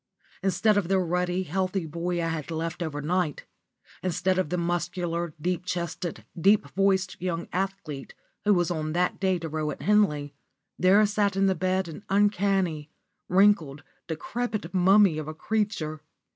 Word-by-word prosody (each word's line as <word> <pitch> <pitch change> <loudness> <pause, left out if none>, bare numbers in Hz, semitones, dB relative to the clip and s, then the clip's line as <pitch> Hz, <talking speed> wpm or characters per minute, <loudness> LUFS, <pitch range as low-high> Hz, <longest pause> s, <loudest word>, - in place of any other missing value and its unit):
Instead 200 +3 +2
of 195 -4 +1
the 195 +1 +2
ruddy, 180 +1 0
healthy 185 +2 -1
boy 170 +3 -2
I 165 - 0
had 160 -2 -4
left 165 +1 -3
over 150 -3 -3
night 175 -2 -1 0.6
instead 185 +1 0
of 185 - 0
the 180 - -1
muscular, 175 -1 -2
deep 180 +3 -1
chested, 175 -1 -4
deep 195 -1 +3
voiced 190 -1 +1
young 175 -2 -2
athlete 185 -7 -4 0.3
who 210 -1 +4
was 175 -1 +1
that 170 +2 -1
day 190 -2 +2
to 165 -1 -5
row 155 -1 -2
at 150 - -6
Henley, 150 -9 +2 0.5
there 195 +4 +6
sat 205 -1 +1
up - - -6
in 195 - +3
the 190 - +3
bed 185 +1 0
an 165 +5 -9
uncanny, 195 -6 +1 0.4
wrinkled, 180 -7 +3 0.2
decrepit 210 +3 -3
mummy 190 -2 +5
of 155 - -6
a 155 - -6
creature. 185 -6 -2
180 Hz, 160 wpm, -27 LUFS, 165-195 Hz, 0.6 s, there